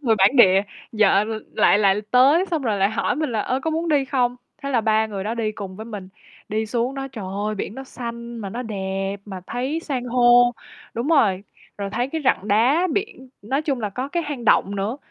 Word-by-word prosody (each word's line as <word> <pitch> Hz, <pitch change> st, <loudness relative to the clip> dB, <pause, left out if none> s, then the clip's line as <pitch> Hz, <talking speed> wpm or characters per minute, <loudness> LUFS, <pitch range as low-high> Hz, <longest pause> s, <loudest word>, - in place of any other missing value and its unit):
người 235 Hz, -6 st, +2 dB
bản 200 Hz, +7 st, +4 dB
địa 195 Hz, -5 st, +6 dB, 0.3 s
vợ 210 Hz, -2 st, +4 dB
l 225 Hz, -, -4 dB, 0.2 s
lại 205 Hz, -, +4 dB
lại 200 Hz, 0 st, +3 dB
tới 275 Hz, +8 st, +5 dB
xong 325 Hz, -4 st, -1 dB
rồi 215 Hz, -5 st, 0 dB
lại 195 Hz, +1 st, +2 dB
hỏi 220 Hz, -, -1 dB
mình 305 Hz, -2 st, -1 dB
là, 220 Hz, -, 0 dB
ơ, 255 Hz, +5 st, -1 dB
có 320 Hz, -, -1 dB
muốn 325 Hz, +2 st, -2 dB
đi 290 Hz, -3 st, +3 dB
không, 250 Hz, -2 st, 0 dB, 0.3 s
thế 280 Hz, -, -3 dB
là 245 Hz, -4 st, +2 dB
3 220 Hz, 0 st, +2 dB
người 200 Hz, -3 st, -5 dB
đó 220 Hz, -, -2 dB
đi 220 Hz, -2 st, -2 dB
cùng 195 Hz, -3 st, -8 dB
với 220 Hz, -, -7 dB
mình. 205 Hz, -5 st, -7 dB, 0.4 s
Đi 220 Hz, +1 st, -1 dB
xuống 240 Hz, +4 st, -1 dB
đó, 270 Hz, 0 st, -5 dB
trời 215 Hz, -6 st, -6 dB, 0.2 s
ơi, 215 Hz, -, -1 dB
biển 205 Hz, +1 st, -5 dB
nó 270 Hz, -, -7 dB
xanh 235 Hz, -2 st, -7 dB
mà 210 Hz, -4 st, -5 dB
nó 240 Hz, +5 st, -4 dB
đẹp, 195 Hz, -3 st, -3 dB
mà 190 Hz, -3 st, -7 dB
thấy 260 Hz, +7 st, -2 dB
san 270 Hz, -6 st, -3 dB
hô 245 Hz, 0 st, +5 dB, 0.4 s
đúng 235 Hz, +5 st, -2 dB
rồi, 210 Hz, -, +3 dB, 0.4 s
rồi 200 Hz, -1 st, -3 dB
thấy 240 Hz, +5 st, -1 dB
cái 320 Hz, +3 st, -3 dB
rặng 210 Hz, -5 st, +1 dB
đá 255 Hz, -, +3 dB
biển, 390 Hz, -11 st, -4 dB
nói 270 Hz, +8 st, -1 dB
chung 275 Hz, -5 st, -1 dB
là 210 Hz, -2 st, -2 dB
có 255 Hz, +7 st, -4 dB
cái 345 Hz, +3 st, -1 dB
hang 290 Hz, -6 st, -5 dB
động 200 Hz, -2 st, +3 dB
nữa. 200 Hz, +6 st, -2 dB
235 Hz, 235 wpm, -22 LUFS, 205-270 Hz, 0.4 s, địa